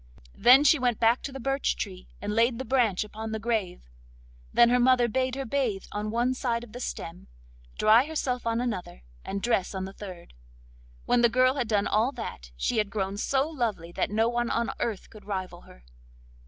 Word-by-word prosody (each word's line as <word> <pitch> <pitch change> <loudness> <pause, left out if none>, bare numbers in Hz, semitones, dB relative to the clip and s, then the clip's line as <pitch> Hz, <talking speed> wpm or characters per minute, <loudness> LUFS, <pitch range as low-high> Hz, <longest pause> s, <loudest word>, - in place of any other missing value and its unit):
Then 260 +4 +6
she 305 0 +5
went 245 -3 0
back 230 +2 +3
to 275 - -5
the 270 - -7
birch 270 +2 0
tree 185 -3 -6
and 205 +1 -3
laid 230 +2 +2
the 260 - -5
branch 225 -6 +2
upon 220 +1 -7
the 220 - -2
grave. 220 - -2 0.7
Then 235 0 +5
her 250 +1 +3
mother 245 -1 +4
bade 255 +2 -1
her 270 0 -4
bathe 225 -6 -1
on 210 +1 -3
one 240 +3 +1
side 240 -2 -2
of 240 - -12
the 245 - -8
stem, 170 -8 -6 0.5
dry 220 +4 +5
herself 260 -6 -2
on 230 0 +1
another, 190 - -4 0.2
and 200 0 -5
dress 210 -5 0
on 190 0 -3
the 190 - -8
third. 185 - -10 0.7
When 245 - +3
the 235 - +5
girl 255 +2 +3
had 260 -4 -2
done 210 -2 +1
all 220 +5 +2
that, 140 - -7
she - - 0
had 210 -1 0
grown 195 -1 -2
so 270 +7 0
lovely 225 - -3
that - - -1
no 220 +2 +2
one 240 0 -1
on 235 0 0
earth 220 -5 -3
could 215 -2 -14
rival 185 -3 -5
her. - - -17
230 Hz, 205 wpm, -27 LUFS, 205-250 Hz, 0.7 s, Then